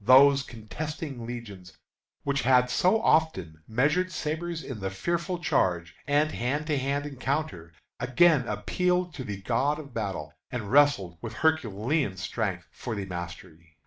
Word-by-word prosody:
Those 135 +4 +7
contesting 135 +2 -6
legions, 100 -9 -8 0.5
which 140 -1 0
had 125 0 +4
so 185 +11 +3
often 95 - +2
measured 145 +11 +2
sabres 160 +1 -3
in 125 -5 -6
the 95 -1 -2
fearful 170 - -2
charge, 85 - +1
and 145 +2 +3
hand 140 +6 -1
to 150 -2 0
hand 140 +2 -1
encounter, 135 - -3 0.3
again 135 0 +4
appealed 180 - 0
to 135 - -6
the 100 -4 -6
God 145 +7 +1
of 140 -4 -10
battle, 95 -10 -4 0.2
and 110 -5 -4
wrested 135 - +4
with 115 -1 -6
Herculean 125 -5 +1
strength 95 -2 -2
for 120 -3 -5
the 100 -1 -3
mastery. 85 -2 -8
125 Hz, 145 wpm, -28 LUFS, 100-150 Hz, 0.5 s, Those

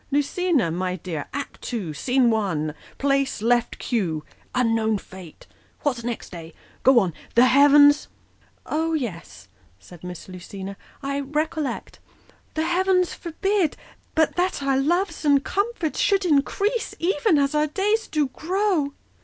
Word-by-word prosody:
Lucina, 290 - +1
my 180 +2 -2
dear, 165 -4 -5
act 280 -1 -6
ii., 180 -9 -3
scene 245 - +2
1 170 -9 -1 0.2
place, 275 -2 +1
left 240 +2 +1
cue 170 -10 -2
' - - -19
Unknown 225 -3 +2
fate,' 185 -4 -12 0.4
What's 250 -5 -1
next, 235 -5 -5
eh? 165 -2 -9 0.3
Go 265 -1 +5
on 185 -6 0
' - - -23
The 240 +2 +7
heavens 290 +2 +6 0.2
' - - -37
' - - -34
" - - -38
Oh 325 0 0
yes," 165 - -5 0.3
said 165 - -15
Miss 180 -1 -8
Lucina, 190 +2 -8 0.2
" - - -30
I 275 +1 -1
recollect 300 -1 -3 0.2
" - - -30
' - - -36
The 315 +1 0
heavens 365 +1 +2
forbid 370 0 -1 0.4
But 320 -1 +2
that 360 -5 0
our 275 -1 +2
loves 340 +4 0
and 285 -2 +4
comforts 400 -5 -1
should 395 -2 +2
increase 395 - +1
Even 340 0 +2
as 280 0 +2
our 300 0 +2
days 415 +8 0
do 305 -2 +1
grow 345 -2 0
275 Hz, 160 wpm, -24 LUFS, 205-325 Hz, 0.4 s, The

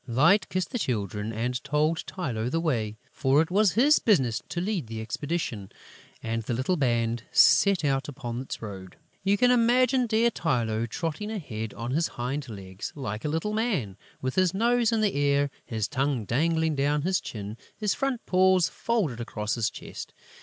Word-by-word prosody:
Light 165 - +4
kissed 185 0 -2
the 245 - -2
Children 105 - -2
and 120 +3 -2
told 150 +3 +1
Tylô 125 -11 -3
the 165 - 0
way, 115 -10 -1
for 135 +2 +2
it 160 +2 +1
was 200 -1 +4
his 285 +7 +5
business 130 - +2
to 175 - -3
lead 185 - -2
the 110 0 -6
expedition; 120 - -3 0.5
and 115 0 -2
the 115 +2 -3
little 130 +10 0
band 120 -5 0
set 195 -5 +5
out 135 -1 +1
upon 120 -3 -5
its 130 - -7
road. 95 -3 -8 0.3
You 200 +1 +3
can 250 +3 +4
imagine 250 +1 +3
dear 230 +2 +3
Tylô 115 - -1
trotting 165 - -3
ahead, 110 - -5
on 115 +2 -4
his 165 +5 +1
hind 130 +3 -3
legs, 95 -3 -7
like 110 -7 -5
a 150 - -1
little 165 +8 -1
man, 200 - -1 0.3
with 130 0 -1
his 185 -1 +2
nose 235 +2 +3
in 225 -1 +1
the 210 -2 +2
air, 140 0 +2
his 110 -3 -2
tongue 135 -3 -1
dangling 160 +6 +1
down 145 +1 +1
his 185 +2 +1
chin, 105 -1 -6 0.2
his 210 -3 0
front 270 -3 -2
paws 185 -4 +4
folded 190 - -1
across 105 -1 -3
his 115 -3 0
chest. - - -9
145 Hz, 180 wpm, -27 LUFS, 115-190 Hz, 0.5 s, his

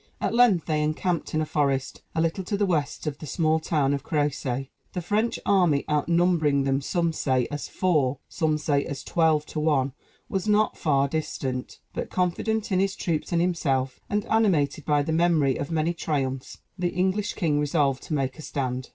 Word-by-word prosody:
At - - -1
length 235 -8 +4
they 155 -2 0
encamped 155 +3 -1
in 155 - +2
a - - 0
forest, 140 -3 -1
a 160 - +2
little 165 +4 0
to 205 +2 -1
the 205 - +2
west 150 -6 -1
of 150 -2 -3
the 155 - -8
small 160 +1 +1
town 150 -3 +1
of 140 -1 -2
Crécy. 135 -3 -1 0.2
The 180 - -2
French 215 +6 0
army, 175 -8 +3
outnumbering 155 -1 +2
them 135 0 +1
some 170 +3 0
say 130 -5 +1
as 145 0 -4
four, 150 -8 +1
some 155 -3 0
say 145 -2 +1
as 140 -1 -6
twelve 160 -3 +2
to 155 - -5
one, 140 -4 +1 0.3
was 195 -3 -2
not 210 +1 +3
far 140 -3 +2
distant; 135 -4 -3 0.2
but, - - -4
confident 205 +5 -1
in 185 - +3
his 195 0 +1
troops 165 -5 -2
and 170 0 +2
himself, 135 -7 0
and 210 0 0
animated 165 -10 +2
by 145 -1 +2
the 160 - -2
memory 160 -5 +3
of 140 - -4
many 165 +1 0
triumphs, 135 -6 -3 0.2
the 180 -1 +1
English 190 +3 0
king 155 -6 +1
resolved 145 -2 +1
to 155 - -3
make 135 +1 -2
a - - -6
stand. 130 -4 -3
155 Hz, 190 wpm, -26 LUFS, 140-175 Hz, 0.3 s, length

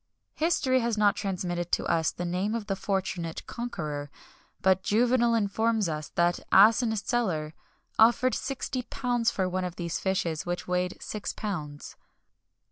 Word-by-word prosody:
History 290 -5 +2
has 235 -2 -1
not 205 -1 +4
transmitted 175 -3 -3
to - - +2
us 160 -1 +1
the 175 - -5
name 185 +5 -1
of 225 -3 -3
the 195 -2 -1
fortunate 185 -4 -3
conqueror; 150 -12 -5 0.5
but 190 0 +4
Juvenal 235 +3 +3
informs 220 0 +1
us 155 -2 -4
that 175 0 +2
Asinius 220 +1 +5
Celer 170 -11 -1 0.5
offered 240 +3 +5
sixty 265 -1 -3
pounds 245 -1 0
for 190 -2 -1
one 185 0 -2
of 180 -1 -4
these 170 -2 -3
fishes 185 -5 -1
which 175 0 -4
weighed 180 0 -1
six 210 -1 -5
pounds. 150 -9 -5
195 Hz, 145 wpm, -28 LUFS, 175-230 Hz, 0.5 s, Asinius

